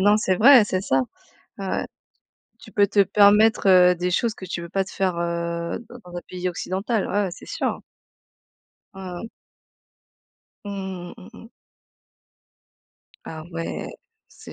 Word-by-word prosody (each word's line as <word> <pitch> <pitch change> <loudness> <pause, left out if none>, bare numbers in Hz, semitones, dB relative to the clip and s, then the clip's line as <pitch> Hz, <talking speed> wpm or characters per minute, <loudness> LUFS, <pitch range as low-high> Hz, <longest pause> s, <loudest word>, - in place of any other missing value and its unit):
Non 205 +2 +5
c'est 190 -3 +1
vrai, 245 +1 +8
c'est 185 -2 -1
ça. 135 -8 +1 0.6
Ouais, 195 - -5
ouais. - - -1 0.7
Tu - - -14
peux 205 -1 +3
te 200 0 +4
permettre, 210 +3 +4
heu, 180 -1 +6
des 180 +1 -1
choses 225 +5 0
que - - -10
tu 175 - -4
peux 170 - -8
pas 195 +3 -1
te 190 - -11
faire, 185 -3 -1
heu, 170 0 -3
dans 245 - -11
dans 175 - -8
un - - -4
pays 180 0 -3
occidental. 190 +5 -2
Ouais, 205 +1 +1
ouais, 190 - -3
c'est - - -11
sûr. - - -3 1.1
Mmh 195 - -10 0.2
mh. 225 - -7 1.4
Mmh, 190 -3 -6
mmh, 185 - -13
mmh - - -12
mh. - - -14 1.8
Ah 160 -1 -7
ouais. 165 0 -4 0.4
C'est - - -13
190 Hz, 160 wpm, -23 LUFS, 175-205 Hz, 1.8 s, vrai